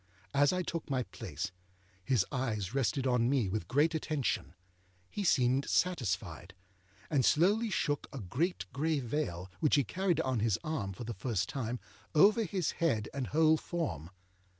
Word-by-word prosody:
As 145 0 +4
I 185 0 0
took 165 -2 -4
my 130 -2 0
place, 90 - -6 0.5
his 110 -2 +2
eyes 110 -6 -2
rested 130 0 0
on 125 -2 +2
me 130 -6 +2
with 95 -3 -3
great 150 - +3
attention; 155 - -1 0.6
he 205 - -3
seemed 130 -5 +3
satisfied, 95 - -1 0.6
and 140 -4 +3
slowly 205 - +3
shook 145 -7 -1
a 140 - -6
great 140 - -1
gray 155 +1 +1
veil, 110 - -3
which 150 - +3
he 140 - +4
carried 185 +1 0
on 130 -5 0
his 110 -3 +2
arm 155 -11 -2
for 95 - -7
the 115 0 -4
first 105 -6 -1
time, 125 -2 -3 0.4
over 210 +8 +6
his 185 -1 -1
head 115 -11 +1
and 135 -3 -3
whole 160 +1 +4
form. 155 - -4
135 Hz, 160 wpm, -32 LUFS, 110-160 Hz, 0.6 s, over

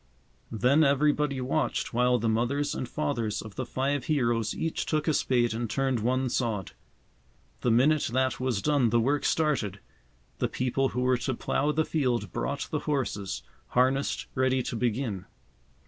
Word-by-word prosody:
Then 125 +7 +3
everybody 145 0 +2
watched 135 +2 -1
while 125 +1 +3
the 115 0 -1
mothers 120 +6 0
and 125 - -4
fathers 120 -8 -2
of 110 -2 -10
the 130 +4 -4
five 135 +2 -1
heroes 120 -7 +1
each 165 - -2
took 155 0 0
a 155 - +3
spade 120 -5 +2
and 115 0 -3
turned 135 -1 0
one 130 +4 +1
sod. 115 -6 -1 0.9
The 125 - 0
minute 140 +6 +3
that 130 +1 +1
was 125 -6 -1
done 145 -6 +3
the 120 +1 +3
work 140 +5 +1
started. 135 - 0 0.6
The - - 0
people 130 +1 0
who 125 - -2
were 125 0 +3
to 130 +1 -2
plough 145 +5 0
the 155 +1 +1
field 130 -7 0
brought 140 0 -3
the 155 - 0
horses, 100 - -2 0.2
harnessed 130 +2 +1
ready 130 -1 +1
to - - -4
begin. 115 -4 -1
130 Hz, 165 wpm, -28 LUFS, 120-140 Hz, 0.9 s, Then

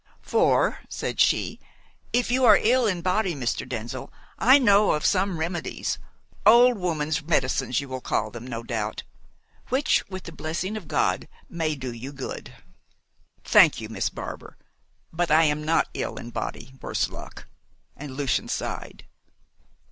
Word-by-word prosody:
"For," - - +2
said - - -4
she, - - +2 0.5
"if 245 -1 +1
you 260 +1 +2
are 215 -5 +8
ill 245 +1 +3
in 180 -4 -1
body, 185 -1 +1
Mr. 125 -4 -2
Denzil, 120 +1 -5 0.3
I 260 +4 +7
know 210 -5 +4
of 150 - -2
some 190 -2 +2
remedies 165 0 -3 0.4
old 240 +2 +6
woman's 160 -3 -1
medicines 135 -5 0
you 140 - -6
will 130 -1 -5
call - - -1
them, 120 +1 -9
no 115 -2 -5
doubt 110 -3 -3 0.7
which, 275 +5 +2
with 185 -1 -7
the 165 - -8
blessing 165 +6 -4
of 205 -8 -7
God, 95 - 0 0.2
may 160 -3 -1
do 130 -3 -5
you 125 +4 -7
good." 135 -2 -7 0.9
"Thank - - +6
you, 110 -1 -7
Miss 105 -3 -1
Barbar, - - -8 0.6
but 175 +1 0
I 155 +2 +6
am 150 -1 +1
not 160 +2 +2
ill - - -3
in 120 - -8
body 130 +2 -5
worse - - -1
luck!" - - -11 0.5
and 140 -2 -8
Lucian 140 -4 0
sighed. - - -5
160 Hz, 155 wpm, -25 LUFS, 130-200 Hz, 0.9 s, are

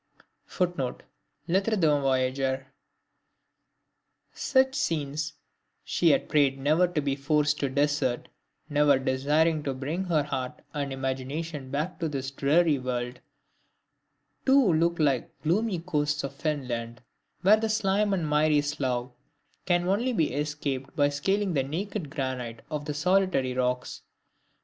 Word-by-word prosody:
[Footnote: 175 -9 -2 0.4
LETTRES 195 +5 +1
D'UN 150 -5 +3
VOYAGEUR] 130 0 0 1.7
Such 265 -1 +2
scenes 155 - -2 0.5
she 170 - +2
had - - +2
prayed 140 -3 +3
never 155 +6 +3
to 170 -3 -1
be 140 -1 0
forced 150 +1 +1
to 140 - 0
desert 145 -2 0 0.4
never 145 -2 +4
desiring 150 +5 +1
to 140 -2 -3
bring 155 +8 -3
her 160 -5 +2
heart 130 -3 -4
and 140 -2 -3
imagination 135 +2 -4
back 150 +8 -3
to 165 -2 -1
this 135 -2 -4
dreary 150 +2 +3
world, 125 -1 -3 1.2
too 265 -8 +5 0.2
like 140 -6 +2
the - - -36
gloomy 200 +3 +1
coasts 150 -3 -1
of 140 - -4
Finland, 125 -6 -3 0.4
where 205 +4 +7
the 220 0 -1
slime 210 -1 +1
and 175 -5 0
miry 150 0 +3
slough 130 -4 -2 0.6
can 175 -1 +2
only 230 +7 +1
be 160 -9 +1
escaped 145 -2 -3
by 145 -1 +3
scaling 190 +7 0
the 140 - +2
naked 175 +4 -4
granite 130 -5 -4
of 150 -1 -3
the 150 - -3
solitary 180 -5 +2
rocks. 125 0 -1
145 Hz, 130 wpm, -27 LUFS, 135-175 Hz, 1.7 s, where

